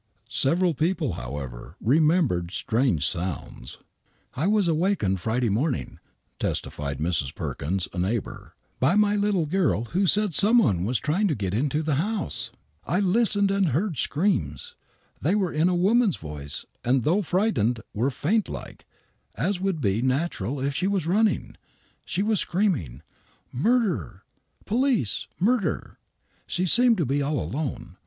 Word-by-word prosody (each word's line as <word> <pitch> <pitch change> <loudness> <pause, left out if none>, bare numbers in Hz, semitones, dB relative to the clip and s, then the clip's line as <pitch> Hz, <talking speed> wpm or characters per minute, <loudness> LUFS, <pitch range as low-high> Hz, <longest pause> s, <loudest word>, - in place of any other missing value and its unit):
Severrl 170 +6 +2
people, 160 - 0
however, 65 0 -7
remembered 145 - +2
strange 110 - 0
sounds. 85 -7 -3 0.3
" - - -40
I - - +2
was 205 -3 +3
awakened 160 - +1
Friday 115 +3 0
morning," 110 - -1 0.4
testified 70 -2 -3
Mrs. 80 -2 -1
Perkins, 90 +6 -3
a 90 - -4
neighbor, 100 +5 -3
" - - -42
by 140 +9 +3
my 210 0 +3
little 200 -5 +1
girl, 155 - +1
who 190 +2 +2
said 210 -1 +4
some 215 +9 +4
one 95 - +3
was 120 +3 +1
trying 175 - +1
to 155 - 0
get 95 -3 -3
into 145 +7 0
the 155 -1 0
house. 210 0 -2 0.3
I 175 +8 0
listened 200 0 +3
and 195 -2 +2
heard 160 - -1
screams. 205 - -1 0.5
They - - +2
were 190 -5 0
in 160 +4 +2
a 180 - +1
woman's 205 +2 +3
voice,, 75 -2 -5 0.2
and 125 0 +2
though 175 - +2
frightened, 175 - +1
were 120 +5 +1
faintlike, 195 - -3 0.5
as 180 - -1
would 190 -5 -1
be 105 -1 +1
natural 135 +1 -1
if 140 +2 -1
she 180 +6 0
was 195 -5 0
running. 210 +5 +1 0.5
She 190 +2 -1
was 215 -2 +1
screaming, 165 - -1 0.3
* - - -37
Murder 175 - 0
I 125 0 -37
Police 235 - 0
I - - -3
Murder! 215 -6 0 0.2
' - - -41
She 180 - -1
seemed 240 +5 +5
to 165 - +1
be 140 +3 0
all 145 0 0
alone. 115 - -4
155 Hz, 155 wpm, -25 LUFS, -, 0.5 s, seemed